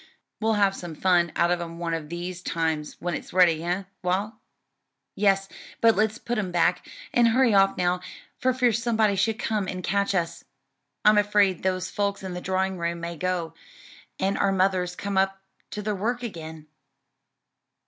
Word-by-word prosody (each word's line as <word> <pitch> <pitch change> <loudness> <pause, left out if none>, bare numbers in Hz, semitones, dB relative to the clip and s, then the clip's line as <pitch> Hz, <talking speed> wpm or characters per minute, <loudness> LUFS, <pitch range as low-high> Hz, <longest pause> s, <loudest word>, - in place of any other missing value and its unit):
"We'll 220 0 +1
have 200 -2 +2
some 175 -4 -7
fun 175 -1 +2
out 170 +1 +2
of 175 -1 +1
'em 165 -1 -6
one 170 -1 -2
of 155 -2 -4
these 175 +1 -5
times 160 -4 -2
when 175 0 -2
it's - - -6
ready, 170 -3 +4
eh, 180 +3 -1 0.2
Wal?" 190 +5 -1 0.8
"Yes, 195 -1 +2 0.3
but 225 -1 +5
let's 215 +2 +1
put 240 -1 -3
'em 190 -4 -2
back, 175 +1 +1 0.2
and 240 -1 +5
hurry 240 0 +4
off 195 0 +4
now, 180 0 +1 0.4
for 255 - +2
fear 250 -1 +2
somebody 220 -2 +2
should 210 +3 +1
come 210 -3 -1
and 185 -1 -5
catch 200 +1 0
us. 170 -1 -2 0.6
I'm 210 0 +7
afraid 205 -3 +2
those 185 -1 -1
folks 200 -1 -1
in 185 -1 -5
the 180 - -5
drawing 190 0 -1
room 170 0 -2
may 170 0 -5
go, 180 -1 -2 0.6
and 195 +1 0
our 200 - +3
mothers 185 -2 +1
come 200 0 -1
up 195 0 +1 0.3
to 210 - -5
their 210 +1 -1
work 235 +5 -2
again." 160 -8 -7
190 Hz, 180 wpm, -25 LUFS, 175-205 Hz, 0.8 s, I'm